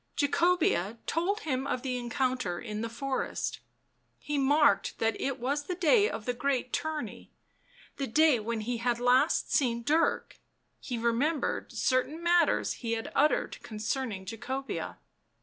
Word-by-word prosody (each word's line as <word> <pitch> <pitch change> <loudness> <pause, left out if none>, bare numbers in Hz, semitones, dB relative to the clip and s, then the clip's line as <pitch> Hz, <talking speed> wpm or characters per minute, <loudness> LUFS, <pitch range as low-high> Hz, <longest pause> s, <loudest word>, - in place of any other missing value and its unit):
Jacobea 285 - +2
told 390 +6 0
him 270 -5 -2
of 255 -2 -2
the 255 -2 -2
encounter 250 -6 -1
in 215 -3 -5
the 230 - -3
forest; 265 +3 -3 0.6
he 295 - -4
marked 285 +1 +3
that 225 0 +1
it 270 -2 -2
was 280 +4 -1
the 360 - -3
day 405 +5 +4
of 215 - -6
the 245 - 0
great 255 0 -1
tourney, 315 -1 -3 0.7
the 275 - -2
day 300 +1 +4
when 225 +1 -3
he 240 +2 -2
had 240 0 0
last 245 +1 +3
seen 235 -5 +1
Dirk; 315 +6 +1 0.4
he 245 - -4
remembered 240 +7 0
certain 280 +6 0
matters 345 0 +3
he 230 -2 -3
had 225 0 -4
uttered 300 +2 +1
concerning 215 -2 -3
Jacobea. 250 +6 -4
260 Hz, 145 wpm, -29 LUFS, 235-300 Hz, 0.7 s, day